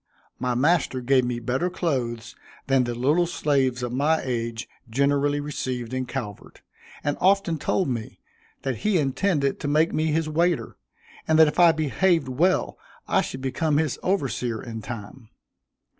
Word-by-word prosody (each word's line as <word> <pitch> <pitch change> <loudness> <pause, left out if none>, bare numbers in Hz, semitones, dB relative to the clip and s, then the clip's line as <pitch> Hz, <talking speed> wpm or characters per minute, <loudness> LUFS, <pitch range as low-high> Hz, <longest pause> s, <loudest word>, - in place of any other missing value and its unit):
My 125 -1 -1
master 145 0 +2
gave 130 0 +2
me 120 -1 -2
better 130 +9 -1
clothes 120 -10 -3 0.3
than 135 -2 +2
the 120 0 -3
little 150 +8 +2
slaves 135 -6 0
of 120 0 -3
my 150 +5 +2
age 115 -2 -3 0.2
generally 140 +3 +1
received 130 -5 -4
in 130 -1 -2
Calvert, 110 -7 -7 0.4
and 145 - -1
often 190 -4 +2
told 185 - 0
me 115 -4 -4 0.4
that 130 -4 -2
he 205 - +1
intended 140 0 0
to - - -4
make 155 +3 +2
me 155 +1 +1
his 160 +1 0
waiter, 170 +2 0 0.5
and 160 - +3
that 160 -1 +7
if 150 - -2
I 170 -1 +8
behaved 165 +2 +1
well 170 +9 +1 0.3
I - - +3
should 130 - -6
become 145 +3 0
his 155 -3 0
overseer 135 - -1
in 115 -2 -7
time. 115 +1 -9
140 Hz, 160 wpm, -24 LUFS, 125-160 Hz, 0.5 s, I